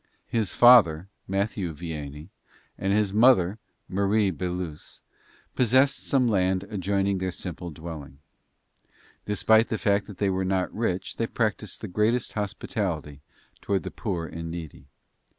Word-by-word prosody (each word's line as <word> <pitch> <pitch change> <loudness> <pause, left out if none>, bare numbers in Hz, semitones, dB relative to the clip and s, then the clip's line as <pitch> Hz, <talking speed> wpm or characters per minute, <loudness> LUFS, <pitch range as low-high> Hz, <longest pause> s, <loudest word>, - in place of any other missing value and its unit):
His 110 -4 -2
father, 100 -9 +6 0.2
Mathieu 95 -3 -2
Vianney, 75 -1 -7 0.5
and 95 - -1
his 105 -1 +1
mother, 110 -4 +4 0.3
Marie 100 +1 +1
Beluse, 90 -3 -5 0.5
possessed 130 +3 +3
some 130 -3 +3
land 95 -3 +1
adjoining 100 0 0
their 95 0 -2
simple 90 0 -6
dwelling. 80 -3 -9 1.1
Despite 110 +2 +4
the 110 - -2
fact 100 -1 +1
that 100 -3 -10
they 100 -2 +1
were 95 0 -1
not 95 -1 -1
rich 95 -5 -2
they 115 - 0
practiced 105 -4 -2
the 110 - -5
greatest 110 +5 0
hospitality 95 -8 -3 0.4
toward 95 -1 -1
the - - -5
poor 90 -6 -3
and 85 0 -6
needy. 80 -4 -8
95 Hz, 135 wpm, -26 LUFS, 85-105 Hz, 1.1 s, father